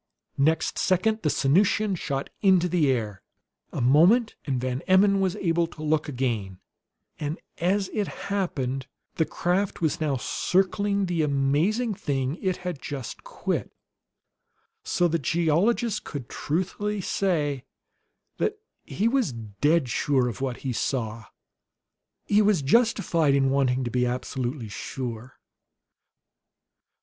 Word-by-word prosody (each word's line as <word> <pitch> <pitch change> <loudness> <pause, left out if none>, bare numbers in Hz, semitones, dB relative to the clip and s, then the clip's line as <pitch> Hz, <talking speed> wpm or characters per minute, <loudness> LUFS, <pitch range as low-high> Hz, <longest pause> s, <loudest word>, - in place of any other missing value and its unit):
Next 160 +4 +2
second 215 +4 +1
the 155 - +1
Sanusian 195 +9 +2
shot 140 -5 -3
into 185 -3 +4
the 170 -5 +2
air. 110 -6 -1 0.5
A - - -3
moment 175 - +5
and 130 -3 -1
Van 130 +1 -2
Emmon 195 +1 +5
was 190 -1 +1
able 170 -4 +1
to 155 -1 -10
look 155 0 +1
again, 115 -8 -2 0.6
and 150 +2 -3 0.2
as 190 +3 +1
it 210 -2 0
happened, 135 -10 -3 0.3
the 160 - +2
craft 185 +5 -1
was 160 -2 0
now 145 -4 +1
circling 200 - +1
the 175 -3 0
amazing 150 - +1
thing 140 -3 -2
it 185 -2 0
had 175 -6 -4
just 135 -5 -6
quit, - - -3 1.1
so 175 - +2
that 165 0 0
the - - -13
geologist 185 - +1
could 140 -5 -6
truthfully 190 +6 -2
say 155 -9 0 0.7
that 430 0 0 0.3
he 215 - -1
was 250 - +1
dead 120 +8 0
sure 130 +1 +1
of 120 +2 -5
what 130 -3 -2
he 130 - -1
saw. 115 -3 -2 1.0
He 210 +1 +4
was 205 -8 +3
justified 170 - +3
in 135 -1 +2
wanting 130 -2 +2
to 120 - -3
be 125 +1 +1
absolutely 125 0 -3
sure. 120 +4 -6
155 Hz, 130 wpm, -26 LUFS, 130-190 Hz, 1.1 s, moment